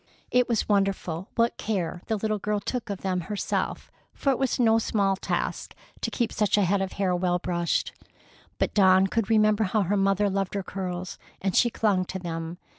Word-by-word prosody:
It 250 0 +3
was 230 -3 +1
wonderful 195 -3 0
what 230 0 +2
care 180 -5 -2
the 220 - +1
little 215 0 -1
girl 210 +1 -1
took 235 +3 -4
of 200 -2 -4
them 185 -2 -1
herself, 205 +4 -3 0.2
for 275 - +1
it 265 - -1
was 265 -2 0
no 225 -2 +4
small 200 -3 +1
task - - -3 0.3
to - - -1
keep 235 -3 -1
such 210 -1 +2
a 205 - +4
head 195 +2 +2
of 190 - -3
hair 190 -2 0
well 180 0 +1
brushed. 175 -1 -1 0.6
But - - 0
Dawn 190 -2 +5
could 225 +2 -1
remember 215 -1 +4
how 205 +2 +1
her 200 +3 0
mother 195 +1 +2
loved 195 0 -1
her 200 - -1
curls, 185 -1 -5 0.2
and 190 -2 -1
she 240 - +5
clung 205 -5 +1
to 190 - -5
them. 165 -1 -5
195 Hz, 195 wpm, -26 LUFS, 185-215 Hz, 0.6 s, Dawn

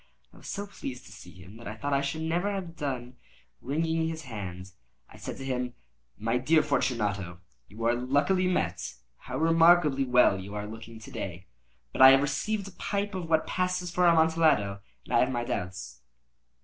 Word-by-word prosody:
I - - -17
was - - -12
so 200 +1 -4
pleased 130 -11 -8
to - - -14
see - - -12
him, 95 +4 -13
that 115 - -10
I 105 - -5
thought 140 +5 -3
I 140 - +3
should 140 +3 -3
never 175 +5 0
have 185 -4 -5
done 130 -5 -4 0.4
wringing 160 +4 0
his 160 -1 -5
hand. 95 -7 -7 0.4
I - - -17
said - - -7
to 135 - -7
him: 125 -2 -2 0.4
"My 115 +3 0
dear 155 +5 +4
Fortunato, 105 - -1 0.3
you 110 +4 -9
are 120 - +4
luckily 145 +9 +1
met. 180 - -1 0.2
How - - -6
remarkably 165 -3 +5
well 125 -6 +4
you 100 +2 -8
are 105 0 -3
looking 115 +1 -9
to 110 - -12
day! 95 -1 -6 0.5
But - - -1
I 130 - +12
have 135 +1 +6
received 200 +8 -1
a - - -9
pipe 200 +3 -3
of 180 -3 -5
what 160 -1 +3
passes 180 -1 -1
for 180 0 +3
Amontillado, 160 -12 +3 0.3
and - - -7
I - - +5
have 125 - +3
my 120 -2 -1
doubts." 90 - -5
135 Hz, 190 wpm, -28 LUFS, 115-165 Hz, 0.5 s, I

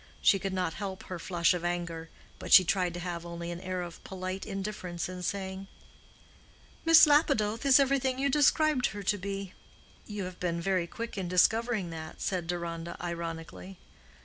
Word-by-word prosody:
She 195 - +4
could 195 +1 -3
not 180 -3 -1
help 190 -2 -5
her 185 -2 -6
flush 170 -1 +2
of 175 -1 -4
anger, 170 -2 -3 0.3
but - - -7
she 185 - +10
tried 180 -1 0
to - - -4
have 175 -1 -4
only 170 0 -6
an 175 +1 -6
air 185 -1 -3
of 170 -1 -10
polite 185 0 -5
indifference 195 -4 -4
in 180 0 -7
saying, 190 +1 -4 1.2
"Miss 330 -1 +9
Lapidoth 280 -6 +2
is 270 0 +7
everything 270 -1 +2
you 275 +1 +1
described 295 -1 +3
her 205 0 -7
to 205 +2 +1
be." 195 0 -5 0.5
"You 210 -2 -4
have 180 0 -7
been 170 -1 -1
very 185 -1 0
quick 230 +1 -6
in 185 - -3
discovering 210 +1 +2
that," 160 -1 -8
said 180 -3 -2
Deronda, 170 -1 -4
ironically. 170 +2 -6
185 Hz, 175 wpm, -30 LUFS, 175-210 Hz, 1.2 s, she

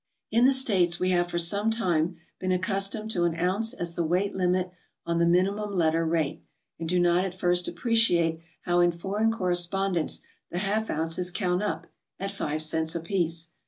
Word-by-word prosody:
In 235 +3 +4
the 270 - +5
States 185 -10 +2
we 185 0 +1
have 175 -1 +1
for 170 - -2
some 200 +6 +2
time 175 -7 0 0.2
been 185 - -1
accustomed 195 +4 -1
to 175 -4 +1
an 170 -1 0
ounce 190 +6 0
as 170 -9 -4
tbe 170 -2 0
weight 185 +4 0
limit 180 -1 +1 0.3
on 170 0 0
the 170 - +3
minimum 200 +4 +1
letter 165 -1 +2
rate, 160 -3 -1 0.4
and 165 -1 -4
do 180 - +1
not 175 +1 +3
at 185 -2 -4
first 180 -1 +1
appreciate 175 -5 +2 0.2
how 175 0 +1
in 175 0 +4
foreign 200 +6 0
correspondence 180 -3 0 0.3
the - - -4
half 210 +3 -1
ounces 165 +3 -1
count 180 -1 0
up, 210 - -2 0.3
at 195 +1 -3
five 155 -5 -1
cents 160 +1 -1
apiece. 165 -1 -1
180 Hz, 180 wpm, -27 LUFS, 170-195 Hz, 0.4 s, the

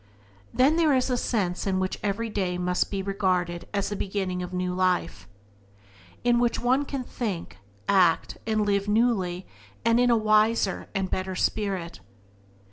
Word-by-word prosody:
Then 280 +6 +3
there 315 -4 +4
is 255 0 +1
a - - +2
sense 200 -7 -1
in 190 -1 +1
which 185 0 -2
every 210 +3 -1
day 190 -4 -2
may 180 0 -1 0.2
be 195 -1 -3
regarded 185 -3 -1
as 200 -1 -1
the 205 - -3
beginning 190 -2 -2
of 180 0 -5
a - - -5
new 180 0 -1
life, 180 - 0 1.0
in 240 0 +3
which 240 -1 +1
one 260 +4 +2
can 275 -2 -4
think, 200 - -5 0.3
act, 180 -4 +3
and 215 -1 +1
live 200 0 +1
newly, 205 -5 +1 0.4
and 230 +1 +4
in 245 0 +4
a 235 - +4
wiser 215 -1 +2
and 195 -1 -1
better 185 0 -2
spirit. 185 -4 -2
200 Hz, 165 wpm, -26 LUFS, 180-230 Hz, 1.0 s, there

